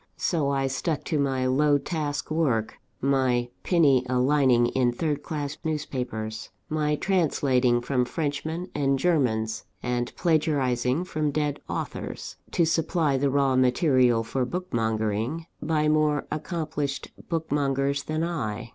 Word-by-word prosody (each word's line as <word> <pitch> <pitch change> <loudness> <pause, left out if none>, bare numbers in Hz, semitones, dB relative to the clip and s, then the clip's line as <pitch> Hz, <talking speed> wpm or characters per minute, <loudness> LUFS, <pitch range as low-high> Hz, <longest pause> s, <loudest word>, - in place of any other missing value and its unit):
So 155 -5 0
I 135 -1 +1
stuck 135 +3 -2
to 155 - -1
my 135 -2 0
low 145 +3 +3
task 145 -1 -3
work; 135 -9 0 0.2
my 130 -3 +2
penny 145 -8 +4
a 125 - +1
lining 130 -2 +4
in 125 -1 +2
third 145 +3 -2
class 145 -1 -4
newspapers; 125 -8 -3 0.2
my 150 -1 +1
translating 135 -9 +2
from 125 0 0
Frenchmen 160 +5 -3
and 135 -2 +1
Germans, 115 -9 +1 0.2
and 125 -1 -1
plagiarising 145 -4 +1
from 155 -5 -1
dead 145 0 -1
authors, - - -5
to 170 - +2
supply 160 -2 +1
the 140 +1 +2
raw 135 -1 +2
material 130 -2 +3
for 125 +3 -1
bookmongering 115 - -1 0.2
by 150 0 +1
more 150 -1 +2
accomplished 155 -3 -3 0.2
bookmongers 140 -3 0
than 155 +1 -1
I. 115 - -3
140 Hz, 130 wpm, -26 LUFS, 125-155 Hz, 0.2 s, penny